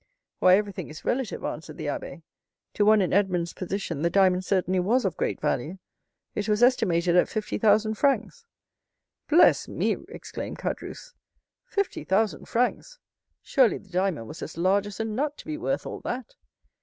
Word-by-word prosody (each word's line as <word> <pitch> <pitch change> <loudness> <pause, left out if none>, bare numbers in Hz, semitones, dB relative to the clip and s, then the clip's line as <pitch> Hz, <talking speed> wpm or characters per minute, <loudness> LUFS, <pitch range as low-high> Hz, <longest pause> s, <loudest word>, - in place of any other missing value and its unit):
"Why, 185 0 +6
everything 200 -4 -4
is 155 - -11
relative," 250 -4 -1
answered - - -5
the - - -5
abbé. - - -5 0.5
"To 205 - +2
one 215 -1 +5
in 180 - -1
Edmond's 180 -4 +1
position 180 -5 -4
the 170 - +2
diamond 185 -1 +3
certainly 185 -1 +1
was 220 +7 +2
of 185 - -1
great - - -2
value. 150 +4 -2 0.6
It 210 +1 -3
was 210 +2 +2
estimated 180 -9 +3
at 180 - +4
fifty 215 -1 -3
thousand 215 0 +3
francs." 280 - 0 0.8
"Bless 325 +4 +5
me!" - - 0
exclaimed - - -7
Caderousse, - - -5 0.5
"fifty 400 -1 -2
thousand 195 -4 0
francs! 250 - -1 0.5
Surely 260 -5 +3
the 200 - -17
diamond 180 - -1
was 155 - -9
as 160 - -7
large 190 +4 +2
as 205 - -9
a 225 - -1
nut 280 +7 -2
to - - -12
be 310 - -4
worth 375 +11 -2
all - - -6
that." 250 -1 -5
205 Hz, 170 wpm, -26 LUFS, 180-240 Hz, 0.8 s, Why